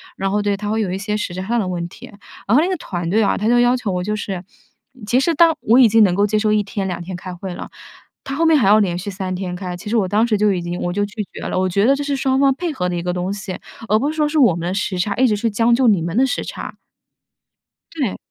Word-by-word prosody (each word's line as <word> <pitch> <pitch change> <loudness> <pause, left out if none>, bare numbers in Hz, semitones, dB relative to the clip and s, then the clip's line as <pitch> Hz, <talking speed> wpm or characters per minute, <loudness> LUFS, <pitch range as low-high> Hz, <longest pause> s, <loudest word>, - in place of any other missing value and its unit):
然 195 0 -2
后， 210 +1 +1
对， 205 -1 0
它 205 +1 -4
会 220 +1 0
有 200 - -1
一 190 - -2
些 210 +1 -3
实 195 -4 -3
质 185 - -4
上 235 +3 0
的 200 - -1
问 175 -1 -3
题， - - -13 0.4
然 220 - +3
后 305 - +5
那 - - 0
个 375 - 0
团 175 - -5
队 220 - +3
啊， 205 - +1
它 210 - -1
就 240 +1 +4
要 245 +1 +3
求 225 -5 -3
我 180 -1 -2
就 210 +3 -2
是 195 -4 -5 0.6
其 245 +5 +2
实 325 +4 +1
当 330 0 +5
我 230 +3 +4
已 255 -3 +8
经 225 +1 +5
能 185 -3 +3
够 200 +2 +3
接 210 +1 +1
受 215 0 +1
1 210 -1 +2
天 195 -1 -4
2 180 -1 -4
天 185 +1 -6
开 180 +1 -7
会 185 +1 -6
了， - - -8 0.5
它 270 0 -5
后 330 - +1
面 320 -1 +5
还 235 - +2
要 210 +2 +6
连 180 -4 0
续 200 +3 -5
3 190 -1 -4
天 180 -1 -4
开。 180 -1 -5
其 185 - -8
实 230 - +1
我 195 - +1
当 210 +4 +2
时 215 -3 +1
就 210 0 +3
已 180 - -2
经 175 +1 -4
我 175 - -1
就 205 +2 0
拒 210 +1 -5
绝 - - -8
了， - - -2
我 185 - +1
觉 200 +4 +2
得 275 - +4
这 290 - -3
是 285 -1 -1
双 265 -1 +1
方 275 -1 +4
配 345 +3 -3
合 180 -8 -2
的 180 - -2
一 170 - -2
个 180 +1 -2
东 180 +1 -2
西， 195 -2 -6 0.3
而 215 - +3
不 280 +6 0
是 - - -8
说 305 -1 +1
是 305 +1 -2
我 230 - +5
们 170 0 -4
的 180 - -1
时 195 -2 -2
差， 200 +3 -1
一 260 - +3
直 215 - +1
是 225 +2 -1
将 230 +3 +2
就 250 0 +3
你 200 -6 +4
们 170 +2 -3
的 260 - +5
时 280 - -2
差。 - - -7 1.2
对， 275 - -2
205 Hz, 330 characters per minute, -19 LUFS, 185-240 Hz, 1.2 s, 已